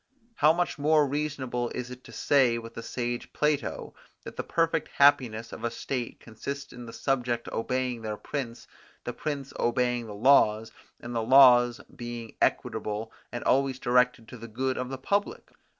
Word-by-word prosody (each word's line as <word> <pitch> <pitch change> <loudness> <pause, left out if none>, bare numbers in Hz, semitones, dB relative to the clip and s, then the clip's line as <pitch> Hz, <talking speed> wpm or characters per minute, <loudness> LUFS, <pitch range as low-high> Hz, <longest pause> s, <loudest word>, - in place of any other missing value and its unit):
How 150 +2 +6
much 175 -2 -1
more 150 +1 +4
reasonable 135 -4 -2
is 125 0 -5
it 125 0 -10
to - - -12
say 130 -5 +3
with 115 0 -8
the 115 - -6
sage 120 0 -4
Plato, 150 -1 -1 0.3
that - - -9
the - - -2
perfect 165 -1 0
happiness 120 -5 +3
of - - -9
a 120 - +1
state 120 +1 -4
consists 140 +5 -7
in 120 -1 -9
the - - -8
subjects 125 -2 -1
obeying 125 0 -2
their 110 -1 -4
prince, 120 -3 -5 0.4
the - - -4
prince 140 -3 -4
obeying 125 -1 0
the 105 - -8
laws, 110 -2 +4 0.3
and 120 +1 -7
the 115 - 0
laws 120 -1 +6
being 120 -2 -7
equitable 105 +1 -1 0.2
and 120 - -5
always 135 0 +2
directed 125 -2 +2
to 125 - -9
the 115 +1 -9
good 130 +4 -2
of 125 0 -4
the 135 - -4
public?" 200 +10 -2
125 Hz, 170 wpm, -28 LUFS, 115-140 Hz, 0.4 s, How